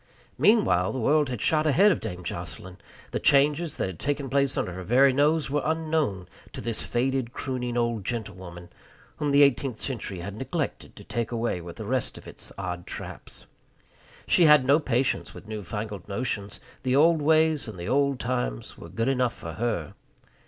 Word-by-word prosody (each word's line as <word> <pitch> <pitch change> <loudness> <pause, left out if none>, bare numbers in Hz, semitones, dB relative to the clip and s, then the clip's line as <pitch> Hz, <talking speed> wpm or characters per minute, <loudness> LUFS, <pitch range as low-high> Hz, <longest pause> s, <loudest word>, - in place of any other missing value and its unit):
Meanwhile 210 - +4
the 130 - -3
world 145 +4 +3
had 125 -4 -4
shot 155 0 +2
ahead 190 +9 +5
of - - 0
Dame 90 -5 -6
Jocelyn. 90 +2 -6 0.3
The - - -1
changes 145 +3 +3
that - - 0
had 95 -3 -6
taken 140 -2 -2
place 140 0 +2
under 90 - -1
her 95 - -6
very 130 +8 +4
nose 145 +1 +2
were 145 0 +1
unknown 155 - -1 0.3
to - - -6
this 115 0 -2
faded, 125 0 -1
crooning 125 -2 -3
old 115 -3 0
gentlewoman, 95 -6 -6 0.5
whom 150 - -1
the 140 +1 +6
eighteenth 135 -3 +2
century 105 -9 -4
had 100 +3 -6
neglected 140 +6 -4
to - - -11
take 120 -1 -3
away 115 -6 -1
with 85 0 -9
the 110 - -7
rest 130 +3 -1
of - - -12
its - - -8
odd 90 -2 -5
traps. - - -8 0.8
She 175 - +4
had 150 -4 +7
no 140 +4 +5
patience 130 -4 -1
with - - -11
newfangled 105 -1 -5
notions. 100 -2 -3 0.2
The 130 0 +1
old 160 +2 +5
ways 155 -1 +3
and 110 - -7
the 85 - -6
old 140 +1 +2
times 115 - -3
were - - -10
good 115 +1 -2
enough 125 -3 +1
for 80 - -7
her. 85 -6 -2
125 Hz, 180 wpm, -26 LUFS, 100-145 Hz, 0.8 s, had